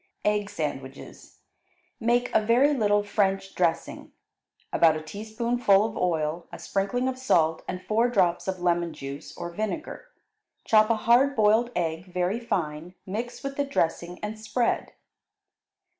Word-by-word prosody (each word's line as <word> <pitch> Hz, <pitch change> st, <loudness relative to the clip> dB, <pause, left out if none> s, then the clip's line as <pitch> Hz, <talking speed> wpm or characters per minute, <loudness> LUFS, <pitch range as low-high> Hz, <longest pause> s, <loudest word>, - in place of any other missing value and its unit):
Egg 210 Hz, -1 st, +1 dB
Sandwiches 145 Hz, -8 st, -7 dB, 0.6 s
Make 240 Hz, +1 st, +1 dB
a -, -, +4 dB
very 245 Hz, +7 st, +4 dB
little 205 Hz, -5 st, +2 dB
French 195 Hz, -2 st, 0 dB
dressing, 170 Hz, -2 st, -1 dB, 0.6 s
about 160 Hz, -2 st, +5 dB
a 155 Hz, -, -4 dB
teaspoonful 215 Hz, +3 st, +1 dB
of 220 Hz, -, -4 dB
oil, 165 Hz, -1 st, -1 dB
a -, -, -7 dB
sprinkling 205 Hz, +6 st, -1 dB
of 260 Hz, 0 st, -3 dB
salt, 165 Hz, -10 st, +2 dB
and 185 Hz, 0 st, -5 dB
four 230 Hz, +3 st, +2 dB
drops 185 Hz, -7 st, +1 dB
of 190 Hz, -1 st, -2 dB
lemon 175 Hz, -1 st, 0 dB
juice, 140 Hz, +1 st, -8 dB
or 175 Hz, -, -5 dB
vinegar. 220 Hz, -, -4 dB, 0.6 s
Chop 215 Hz, 0 st, +5 dB
a 230 Hz, -, +4 dB
hard 245 Hz, +6 st, +3 dB
boiled 220 Hz, +2 st, +4 dB
egg 170 Hz, +1 st, -2 dB
very 180 Hz, +5 st, 0 dB
fine, 170 Hz, -6 st, -3 dB
mix 225 Hz, +6 st, -5 dB
with 275 Hz, 0 st, -5 dB
the 285 Hz, -, +2 dB
dressing, 175 Hz, -9 st, -1 dB
and 215 Hz, +1 st, -4 dB
spread. 230 Hz, +3 st, -1 dB
205 Hz, 145 wpm, -26 LUFS, 170-230 Hz, 0.6 s, about